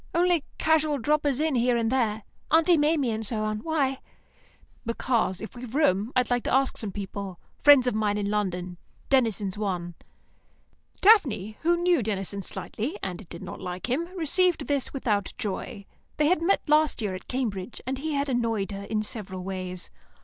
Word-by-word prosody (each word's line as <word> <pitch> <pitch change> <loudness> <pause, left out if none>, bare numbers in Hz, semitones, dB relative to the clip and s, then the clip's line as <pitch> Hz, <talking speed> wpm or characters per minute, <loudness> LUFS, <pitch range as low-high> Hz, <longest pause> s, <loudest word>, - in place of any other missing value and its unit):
Only 345 -3 +3
casual 310 -2 +2
droppers 290 +1 +1
in 310 -1 +1
here 245 -1 +2
and 230 0 0
there; 220 -5 0 0.3
Aunt 320 +2 +4
Maimie 295 -4 +2
and 220 0 -3
so 215 0 -1
on. 215 0 -1
Why?" 275 -1 0 0.8
"Because, 230 -4 0
if 220 - -8
we've 245 0 -8
room, 220 -7 +2
I 250 - +5
want 245 -1 0
to - - -1
ask 270 0 +2
some 210 -3 -4
people; 195 -1 -6 0.2
friends 285 -3 +7
of 250 - +1
mine 210 -1 +1
in 205 -1 -1
London. 180 -4 -2 0.3
Denison's 215 -7 +1
one." 180 -4 -2 1.1
Daphne, 255 - +4
who 345 +1 +3
knew 350 -4 +3
Denison 200 -2 -2
slightly, 245 - -4
and 185 0 -5
did 170 - -8
not - - -8
like 180 +6 -5
him, 310 +7 +1
received 340 -1 +2
this 280 -3 0
without 210 -7 -1
joy. 200 0 -4 0.3
They 300 - +3
had 330 +1 +3
met 380 +4 +1
last 305 0 +3
year 200 -3 -1
at 185 - -8
Cambridge, 230 -5 -3
and 260 +1 -3
he 310 +2 -2
had 280 0 0
annoyed 230 -6 0
her 200 0 -6
in 215 0 -1
several 190 -5 -6
ways. 185 -1 -5
235 Hz, 175 wpm, -26 LUFS, 200-290 Hz, 1.1 s, friends